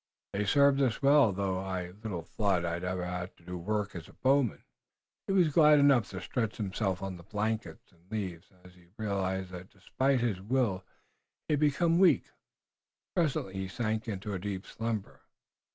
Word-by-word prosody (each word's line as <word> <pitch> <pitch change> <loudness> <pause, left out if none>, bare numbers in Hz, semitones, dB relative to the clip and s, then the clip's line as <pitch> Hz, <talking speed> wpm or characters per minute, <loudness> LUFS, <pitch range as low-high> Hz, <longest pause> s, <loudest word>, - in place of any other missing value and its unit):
They've 100 0 0
served 140 +1 +5
us 130 0 0
well, 140 -5 +6
though 95 -1 -1
I 95 -2 -4
little 100 -3 -6
thought 95 -1 0
I'd 85 +1 -2
ever 90 0 -2
have 90 0 -5
to 85 - -23
do 90 +1 -6
work 105 +3 -2
as 85 -2 -8
a - - -16
bowman." 135 -2 +1 0.6
He 195 - 0
was 175 -6 +3
glad 150 -1 +7
enough 140 -6 +4
to 95 - -6
stretch 115 -1 -2
himself 95 -2 -2
on 95 -2 -4
the 85 - -13
blanket 110 +3 -2
and 90 0 -28
leaves, 95 -4 -4
as 90 - -15
he 90 -1 -21
realized 95 -3 -2
that 90 +1 -9
despite 130 +7 0
his 105 -6 -1
will 105 -4 0 0.6
he - - +1
had 145 - +2
become 165 +3 +3
weak. 190 -2 +4 0.8
Presently 150 - 0
he 95 0 -3
sank 110 +3 -2
into 100 -1 -4
a 95 - -2
deep 95 0 -4
slumber. 115 -3 -4
100 Hz, 180 wpm, -30 LUFS, 95-125 Hz, 0.8 s, glad